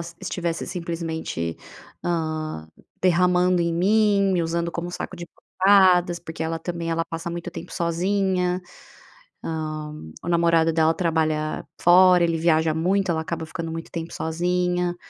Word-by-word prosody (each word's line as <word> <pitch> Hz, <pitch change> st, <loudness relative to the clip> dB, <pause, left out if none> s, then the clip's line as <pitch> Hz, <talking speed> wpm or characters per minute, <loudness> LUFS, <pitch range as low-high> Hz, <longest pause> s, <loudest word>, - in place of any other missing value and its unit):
s 170 Hz, 0 st, -8 dB
estivesse 175 Hz, -3 st, -3 dB
simplesmente, 165 Hz, -, -4 dB, 0.5 s
hã, 155 Hz, -, -2 dB, 0.3 s
derramando 180 Hz, 0 st, +3 dB
em 170 Hz, 0 st, 0 dB
mim, 200 Hz, +2 st, +3 dB
me 175 Hz, -, +1 dB
usando 170 Hz, +1 st, -1 dB
como 175 Hz, +1 st, -4 dB
saco 180 Hz, +1 st, -6 dB
de 170 Hz, -, -7 dB
pancadas. 185 Hz, -2 st, +3 dB
Porque 160 Hz, -1 st, -7 dB
ela 165 Hz, 0 st, -2 dB
também, 170 Hz, 0 st, -4 dB
ela 165 Hz, 0 st, 0 dB
passa 165 Hz, +1 st, -5 dB
muito 175 Hz, +1 st, -5 dB
tempo 170 Hz, +2 st, -9 dB
sozinha, 180 Hz, +1 st, 0 dB, 0.8 s
hã, 155 Hz, -1 st, -4 dB, 0.3 s
o -, -, -4 dB
namorado 170 Hz, -1 st, +3 dB
dela 160 Hz, 0 st, +3 dB
trabalha 155 Hz, -3 st, -1 dB
fora, 180 Hz, 0 st, +6 dB
ele 165 Hz, -1 st, +1 dB
viaja 160 Hz, -1 st, +2 dB
muito, 185 Hz, +3 st, +1 dB
ela 160 Hz, -, 0 dB
acaba 165 Hz, 0 st, -4 dB
ficando 165 Hz, +1 st, -5 dB
muito 165 Hz, 0 st, -7 dB
tempo 165 Hz, 0 st, -5 dB
sozinha. 180 Hz, +2 st, -1 dB
170 Hz, 145 wpm, -24 LUFS, 165-180 Hz, 0.8 s, fora